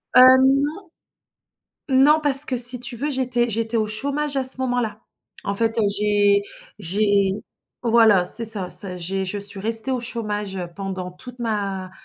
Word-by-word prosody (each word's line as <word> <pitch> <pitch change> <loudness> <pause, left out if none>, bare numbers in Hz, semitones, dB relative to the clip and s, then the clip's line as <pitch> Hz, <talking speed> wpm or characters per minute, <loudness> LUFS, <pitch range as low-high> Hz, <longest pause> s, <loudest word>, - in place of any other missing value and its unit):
Heu, - - +8 0.2
non. 280 +7 0 1.1
Non, 280 +4 +3
parce 285 -1 +8
que 260 -4 -3
si 245 +1 +3
tu 245 0 -3
veux, 290 +6 -3
j'étais 245 -3 -1
j'étais 225 +1 -3
au 215 -1 0
chômage 280 +6 -3
à 265 - -1
ce 260 0 +5
moment-là. 245 -4 -3 0.4
En 200 - -3
fait, 225 +1 +1
heu, - - +1 0.2
j'ai 205 -1 +1 0.4
j'ai 200 +1 0 0.5
voilà, 225 -6 +3
c'est 230 +6 -1
ça, 205 -5 +2
ça 180 0 -4
j'ai 190 +2 -4
je 195 +2 -5
suis 200 0 -1
restée 225 +3 +1
au 255 - -1
chômage, 210 -5 -5
heu, 175 -2 -6
pendant 190 -2 -6
toute 250 +8 -13
ma, 200 -5 -4
225 Hz, 170 wpm, -21 LUFS, 200-250 Hz, 1.1 s, Heu